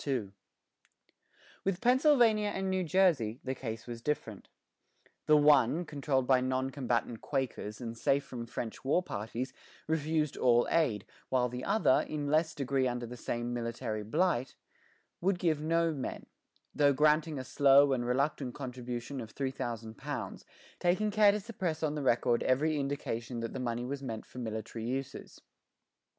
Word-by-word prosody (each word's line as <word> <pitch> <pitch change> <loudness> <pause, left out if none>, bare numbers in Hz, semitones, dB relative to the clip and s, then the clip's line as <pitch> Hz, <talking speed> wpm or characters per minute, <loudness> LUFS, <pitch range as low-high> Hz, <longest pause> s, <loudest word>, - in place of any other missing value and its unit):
With 190 -2 0
Pennsylvania 245 -4 +4
and 195 -2 -2
New 185 -1 +1
Jersey 155 - +2
the 130 - -2
case 115 -3 -6
was 120 -1 -7
different. 115 -7 -3 0.8
The 150 - +7
one, 145 +2 +4
controlled 140 -3 -1
by 130 -1 +4
non 130 +1 -1
combatant 120 -4 -1
Quakers 125 -6 -3
and 115 -2 -5
safe 135 +4 +1
from 125 -4 -7
French 115 -1 -6
war 145 +7 +2
parties, 115 - -4 0.3
refused 155 -1 0
all 120 -1 +4
aid; 120 - +1 0.2
while 125 -1 +2
the 125 +1 -6
other, 215 -11 +3
in 145 -2 -2
less 160 +1 +2
degree 135 -2 0
under 120 -1 -3
the 120 +1 -8
same 120 0 -3
military 115 -2 -3
blight, 135 - 0 0.7
would 190 +1 +2
give 160 -4 +1
no 165 +1 +1
men, 135 -4 -5 0.5
though 145 -1 +4
granting 150 +2 +3
a 130 - -4
slow 140 +1 +5
and 125 -2 0
reluctant 130 +1 -1
contribution 125 -1 -5
of 115 -1 -10
£3,000, 115 -5 -4 0.4
taking 185 +5 +1
care 210 0 +6
to 210 - -1
suppress 185 -7 -4
on 150 -1 +1
the 150 - -3
record 120 -2 +2
every 150 +4 +2
indication 125 -4 -3
that 115 - -4
the 130 - -4
money 120 -1 -2
was 140 +2 -4
meant 115 -5 -5
for 125 - -10
military 110 -1 -5
uses. 135 +2 -5
135 Hz, 150 wpm, -31 LUFS, 120-155 Hz, 0.8 s, The